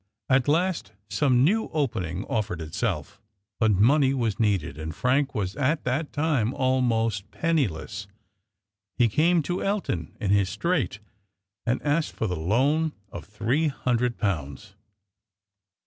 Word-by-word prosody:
At 130 0 +3
last 165 - +1 0.2
some 130 -2 +3
new 215 +9 +2
opening 95 - -1
offered 100 -6 -2
itself; 95 +3 -3 0.4
but 110 -2 +4
money 135 +7 +4
was 115 -6 -1
needed, 100 -10 +1
and 80 +1 -6
Frank 135 - +1
was 95 -3 -2
at 145 +3 0
that 140 +5 -1
time 145 -7 0
almost 115 -6 +1
penniless. 110 - -1 0.9
He 120 - +5
came 165 +8 +3
to 175 +4 -2
Elton 110 - -2
in 100 -5 0
his 100 -2 +3
strait, 170 - -1 0.7
and 120 +2 +2
asked 150 +2 0
for - - -2
the 90 -4 -1
loan 135 - +1 0.2
of 90 - -7
three 120 +9 0
hundred 125 -3 0
pounds. 75 - -3
120 Hz, 130 wpm, -26 LUFS, 100-145 Hz, 0.9 s, He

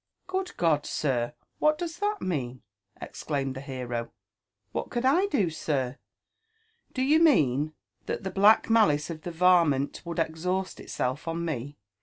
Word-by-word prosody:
" - - -51
Good 375 0 -3
God, 155 -4 +2
sir! 120 -6 -1 0.2
what 305 0 +3
does 340 0 -5
that 415 +1 -1
mean?" 130 -8 -3 0.4
exclaimed 140 -3 -3
the 130 - -6
b«ro. 125 -3 -4 0.3
*' 100 +1 -53
What - - -3
could 240 +1 -2
I 345 +10 +4
do, 205 - +1
sir? 140 -4 -2 0.9
Do 260 - -1
you 300 +4 +4
mean 155 - +3 0.3
that - - -3
the 190 - -3
black 205 +3 +5
malice 190 -10 +3
of 155 -1 -7
the 175 - -5
varmint 165 -5 +3
would 170 0 -6
exhaust 180 +4 -1
itself 130 +6 -3
on 165 +1 -2
me? 145 -2 -4
165 Hz, 160 wpm, -27 LUFS, 135-220 Hz, 0.9 s, black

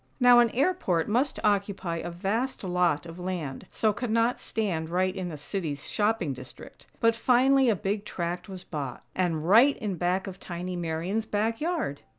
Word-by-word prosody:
Now 245 -1 +7
an 240 -1 +5
airport 245 - +1
must 250 +7 +1
occupy 200 -4 0
a 165 - -4
vast 205 +10 -2
lot 175 -4 +1
of 165 +1 -9
land, 175 -7 -4
so 215 -1 +1
cannot 230 +2 +1
stand 175 -8 -2
right 185 +2 +1
in 185 -3 -4
a 155 - -6
City's 150 -2 -4
shopping 210 -8 0
district; 130 0 -12
but 230 0 +4
finally 260 +2 +4
a 220 - +3
big 200 +1 -2
tract 175 -1 -4
was 185 -2 -8
bought, 140 -6 -6
and 165 -4 -1
right 240 +9 +6
in 200 -4 -3
back 180 +3 0
of 190 -1 -8
tiny 180 0 -5
Marian's 175 +6 -2
back 225 +3 -1
yard! 315 - -2
190 Hz, 170 wpm, -27 LUFS, 170-225 Hz, -, Now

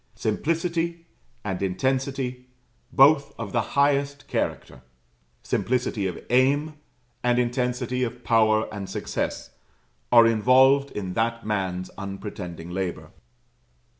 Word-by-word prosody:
Simplicity, 165 +7 -1 0.4
and 95 -3 -3
intensity, 130 +5 -2 0.4
both 140 +2 +5
of 110 -4 -5
the 120 - +1 0.2
highest 140 0 +2
character; 65 - -3 0.6
simplicity 120 -5 -1
of 90 - -5
aim, 140 +5 +3 0.5
and 120 0 +2
intensity 125 +1 -1
of 120 0 -5
power 110 -1 +3
and 100 -2 -6
success, - - -4 0.6
are 115 - +8
involved 130 +5 +4
in 95 -3 -5
that 115 +2 -1
man's 95 -4 -2
unpretending 95 -4 -7
labour. 95 -1 -4
120 Hz, 105 wpm, -25 LUFS, 100-135 Hz, 0.6 s, are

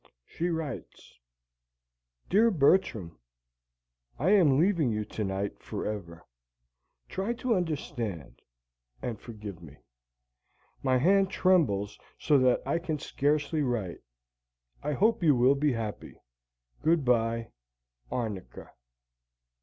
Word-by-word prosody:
She 170 - -3
writes: 160 - -6 1.1
Dear 220 +5 +4
Bertram: 140 - +2 1.0
I 165 +9 +2
am 165 -10 +5
leaving 170 -4 +3
you 105 -1 -2
tonight 100 -1 -3
for - - -5
ever. 85 -6 -6 0.8
Try 195 +5 -2
to 240 0 -1
understand 140 - -3 0.6
and 115 -4 -3
forgive 105 -6 -9
me. 75 -4 -13 1.0
My 130 -1 +2
hand 195 +7 +4
trembles 145 - +2 0.2
so 145 -3 +3
that 130 -1 +3
I 170 - 0
can 160 -3 -3
scarcely 150 +2 0
write. 120 -10 -2 0.8
I 150 +1 -2
hope 215 +7 +2
you 155 -5 +5
will 125 +3 +5
be 140 0 +1
happy. 110 -3 -5 0.7
Goodbye! 120 -7 +1 0.6
Arnica. 105 - -5
135 Hz, 105 wpm, -29 LUFS, 105-165 Hz, 1.1 s, am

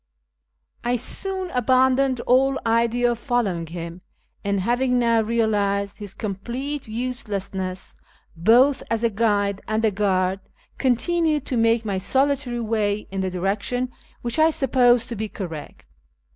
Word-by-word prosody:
I 240 +1 +1
soon 375 - -1
abandoned 260 +1 +3
all 270 +2 +3
idea 235 +1 +2
of 235 - -4
following 200 -10 -1
him, 170 +1 -7 0.4
and, 200 -1 0
having 250 +4 +1
now 230 -2 +3
realised 205 -3 0
his 205 -2 -7
complete 240 +8 -4
uselessness, 200 -6 -4 0.4
both 240 +11 +4
as 230 0 -1
a 230 - +2
guide 205 -2 +1
and 220 +1 0
a 215 - +3
guard, 190 -2 +1 0.4
continued 300 +3 +1
to 255 - -2
make 230 0 +2
my 195 -3 -1
solitary 265 +3 0
way 215 -2 -1
in 195 0 -2
the 190 - -1
direction 200 +7 -2 0.3
which 240 +5 -1
I 315 +1 +6
supposed 245 -5 +3
to 235 - -4
be 215 0 -4
correct. 165 - -7
230 Hz, 135 wpm, -23 LUFS, 200-255 Hz, 0.4 s, I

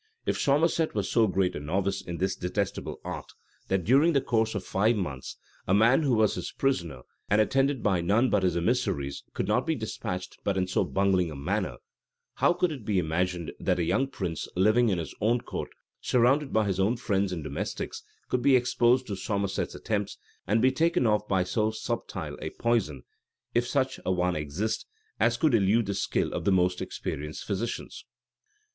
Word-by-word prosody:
If - - 0
Somerset 155 +2 +2
was 100 -3 -1
so 115 -2 +4
great 95 -1 0
a - - -3
novice 95 +6 -1
in 85 -1 -6
this 95 +2 0
detestable 95 +2 -3
art, - - -6 0.3
that, 95 -2 0
during 140 - +4
the 140 - +4
course 110 -2 0
of 100 - -2
five 110 +6 +2
months, 70 -11 -4 0.3
a 95 - +3
man 115 +8 +5
who 135 -5 +2
was 110 -1 +3
his - - -4
prisoner 85 - -1 0.3
and 100 - +4
attended 135 +4 +2
by 95 -4 +2
none 105 +9 +2
but 105 - +3
his 90 -2 +1
emissaries, 85 - -1
could - - -1
not - - +1
be - - +1
despatched 90 0 -5
but 100 -1 0
in 95 - +2
so 90 - +1
bungling 95 -3 +1
a 75 - -7
manner, 70 - -2 0.6
how - - +4
could 175 -1 +1
it 135 -7 -7
be 105 -1 0
imagined, 85 0 -1
that 90 - +1
a 85 - +1
young 95 +11 +1
prince, 90 - -4
living 110 +6 +4
in 95 - +1
his 85 - -5
own 115 +4 +3
court, - - -5 0.3
surrounded 135 +4 +2
by 110 -1 +2
his 95 -2 -1
own 105 +6 +2
friends 100 -4 0
and 85 -4 -4
domestics, - - -4 0.3
could 125 - 0
be 135 +1 +5
exposed 125 0 +3
to 100 - -4
Somerset's 100 0 -2
attempts, 105 -2 -2 0.3
and 110 +3 +2
be 130 - +5
taken 165 +1 +2
off 105 -1 +2
by 95 -2 +2
so 105 +4 0
subtile 110 0 -4
a - - -3
poison, 105 - -1 0.5
if 120 +1 +2
such 135 -1 0
a - - 0
one 90 -1 +1
exist, 75 +9 -3 0.3
as 120 +2 +3
could 150 0 +2
elude 110 +1 +3
the 100 - -2
skill - - -1
of - - -3
the 100 - +2
most 90 -1 +2
experienced 75 +2 -5
physicians? 105 +3 -4
100 Hz, 190 wpm, -28 LUFS, 90-120 Hz, 0.6 s, man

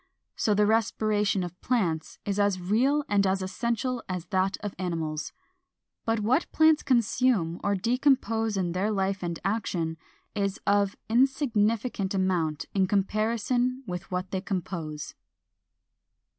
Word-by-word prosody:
So 210 - +1
the 210 +1 +4
respiration 215 -2 +1
of 180 0 -8
plants 170 -11 -1
is 200 0 -1
as 200 -2 +2
real 250 +11 +2
and 200 -4 +3
as 190 0 0
essential 235 +5 -2
as 180 -2 -3
that 190 0 +1
of 205 -1 -4
animals. 165 -4 -3 0.7
But 225 -1 +1
what 255 +10 +1
plants 315 -1 +5
consume 235 - +1
or 200 0 +2
decompose 230 -1 +1
in 180 -2 0
their 185 +4 0
life 195 -2 0
and 170 -2 -3
action 180 -6 -1 0.4
is 200 -2 -1
of 200 -1 +2
insignificant 230 -5 +1
amount 175 -5 0
in 190 -2 +2
comparison 230 +6 0
with 180 -1 -6
what 185 +1 -3
they 190 - -1
compose. 170 -6 -4
205 Hz, 130 wpm, -27 LUFS, 185-230 Hz, 0.7 s, plants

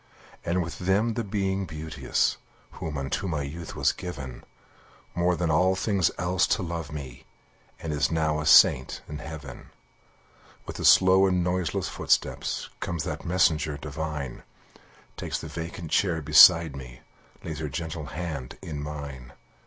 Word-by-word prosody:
And 90 +2 0
with 85 - -7
them 100 +5 +1
the 115 - -2
Being 95 -2 -2
Beauteous, 80 0 -1 0.3
Who 80 - -6
unto 70 +8 -2
my 75 -5 -2
youth 80 +4 -7
was - - +2
given, 70 -8 -7 0.7
More 90 +1 +1
than 85 -1 0
all 90 +4 +3
things 95 -3 +1
else 90 +1 +1
to 100 - -4
love 85 -3 -5
me, 65 -5 -8 0.5
And 80 -2 -4
is 70 -3 +1
now 80 -2 +1
a 75 - -3
saint 65 -3 +5
in 75 0 -6
heaven. 75 -4 -9 1.0
With - - -7
a - - -2
slow 95 +1 +6
and 90 -1 +1
noiseless 90 -2 -1
footstep - - 0 0.4
Comes 85 -4 -3
that - - -5
messenger 80 -4 +2
divine, 75 -2 -5 0.8
Takes - - -3
the - - -7
vacant 85 0 -6
chair 85 -5 +2
beside 80 0 +7
me, 65 -2 -10 0.4
Lays 80 -2 -5
her 75 -2 -3
gentle 80 +1 -5
hand 75 -6 -6
in 75 -3 -5
mine. 70 -4 -7
80 Hz, 150 wpm, -26 LUFS, 75-90 Hz, 1.0 s, beside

